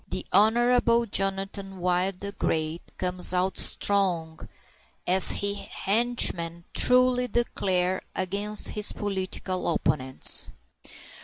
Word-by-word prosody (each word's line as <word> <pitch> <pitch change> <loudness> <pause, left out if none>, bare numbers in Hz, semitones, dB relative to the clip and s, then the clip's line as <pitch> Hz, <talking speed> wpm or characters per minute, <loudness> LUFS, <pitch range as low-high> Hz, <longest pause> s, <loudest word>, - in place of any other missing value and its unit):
The - - -6
Honorable 235 +2 +2
Jonathan 195 -1 -2
Wild 180 +1 -2
the 200 0 -5
Great 160 -3 -3 0.2
comes 180 0 +1
out 185 +1 -1
strong, 175 -6 0 0.7
as 185 +1 +4
his 200 0 -4
henchmen 195 -8 -1
truly 250 0 +4
declare, 190 -6 -1
against 200 +3 -2
his 210 0 -2
political 190 -2 -4
opponents. 130 -3 +3
195 Hz, 95 wpm, -25 LUFS, 180-210 Hz, 0.7 s, as